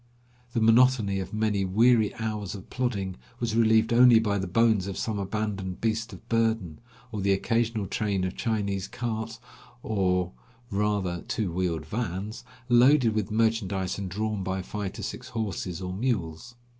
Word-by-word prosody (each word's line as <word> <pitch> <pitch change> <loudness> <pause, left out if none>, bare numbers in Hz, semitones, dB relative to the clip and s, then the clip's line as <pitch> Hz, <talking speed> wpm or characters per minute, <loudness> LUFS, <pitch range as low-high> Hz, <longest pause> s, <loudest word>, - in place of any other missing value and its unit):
The 115 - 0
monotony 115 -3 +4
of 95 0 -5
many 105 -2 0
weary 110 +3 +4
hours 105 -3 -3
of 95 - -11
plodding 105 -7 -2 0.2
was 115 -2 -1
relieved 110 0 +4
only 120 -1 +8
by 100 -2 0
the 95 - -3
bones 110 0 +3
of 100 - -5
some 110 -3 -2
abandoned 100 -2 -3
163 115 - +4
beast 115 +1 -5
of 95 - -12
burden, 115 -8 0 0.3
or 105 -2 -3
the 100 0 +3
occasional 115 +1 0
train 100 -1 -1
of 95 0 -2
Chinese 100 -4 -1
carts, 115 -1 -4 0.5
or 90 -4 0 0.4
rather 100 -4 0
two 110 -6 -1
wheeled 85 -3 -1
vans, 105 +3 -4 0.2
loaded 125 -1 +5
with 105 -3 -1
merchandise, 105 -4 0
and 95 -2 -4
drawn 105 +2 -2
by 95 0 -2
five 100 0 -4
to - - -7
six - - -6
horses 95 -5 -4
or 90 0 -4
mules. 100 -2 -2
105 Hz, 160 wpm, -27 LUFS, 95-115 Hz, 0.5 s, only